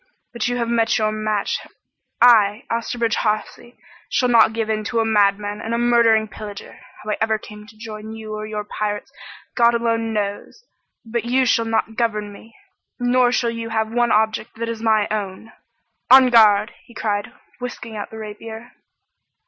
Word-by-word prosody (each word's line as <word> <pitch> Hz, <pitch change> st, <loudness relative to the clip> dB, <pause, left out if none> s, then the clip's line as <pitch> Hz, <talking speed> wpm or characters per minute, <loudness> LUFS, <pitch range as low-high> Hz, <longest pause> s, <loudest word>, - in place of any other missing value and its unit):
But 235 Hz, -1 st, -2 dB
you 245 Hz, 0 st, -1 dB
have 235 Hz, -1 st, -1 dB
met 230 Hz, -1 st, +2 dB
your 215 Hz, -1 st, +1 dB
match. 215 Hz, -1 st, -1 dB, 0.6 s
I, 215 Hz, -3 st, +5 dB
Osterbridge 230 Hz, 0 st, -1 dB
Hawsey, 215 Hz, +3 st, -3 dB, 0.3 s
shall 250 Hz, -, +1 dB
not 230 Hz, -2 st, +5 dB
give 225 Hz, -1 st, -2 dB
in 215 Hz, -1 st, -1 dB
to 235 Hz, +1 st, -1 dB
a 225 Hz, -, +2 dB
madman 205 Hz, -1 st, +1 dB
and 230 Hz, +1 st, -2 dB
a -, -, 0 dB
murdering 235 Hz, -2 st, +3 dB
pillager. 210 Hz, -1 st, -10 dB, 0.2 s
How 215 Hz, -, -3 dB
I -, -, -1 dB
ever 220 Hz, 0 st, +2 dB
came 210 Hz, 0 st, -12 dB
to 215 Hz, 0 st, -17 dB
join 215 Hz, -1 st, -8 dB
you 220 Hz, -1 st, -8 dB
or 215 Hz, 0 st, -5 dB
your 210 Hz, -1 st, -4 dB
pirates 205 Hz, 0 st, -4 dB, 0.4 s
God 235 Hz, 0 st, +4 dB
alone 230 Hz, -1 st, 0 dB
knows, 210 Hz, -, -4 dB, 0.4 s
but 230 Hz, +1 st, -3 dB
you 255 Hz, +2 st, +2 dB
shall 230 Hz, -2 st, +2 dB
not 225 Hz, 0 st, -1 dB
govern 210 Hz, -3 st, -1 dB
me! 220 Hz, +2 st, -15 dB, 0.4 s
Nor 245 Hz, 0 st, +3 dB
shall 240 Hz, -1 st, +1 dB
you 230 Hz, 0 st, -5 dB
have 220 Hz, 0 st, -1 dB
one 240 Hz, 0 st, +2 dB
object 220 Hz, +1 st, 0 dB
that 230 Hz, +1 st, -4 dB
is 230 Hz, -1 st, -5 dB
my 220 Hz, -2 st, +2 dB
own! 210 Hz, 0 st, -4 dB, 0.6 s
En 260 Hz, -1 st, +8 dB
garde!" 215 Hz, -2 st, +5 dB
he 235 Hz, -, -19 dB
cried, 205 Hz, -2 st, -2 dB, 0.3 s
whisking 245 Hz, -2 st, -7 dB
out 205 Hz, -, -5 dB
the 220 Hz, -, -10 dB
rapier. 220 Hz, +2 st, -9 dB
220 Hz, 175 wpm, -21 LUFS, 215-235 Hz, 0.6 s, En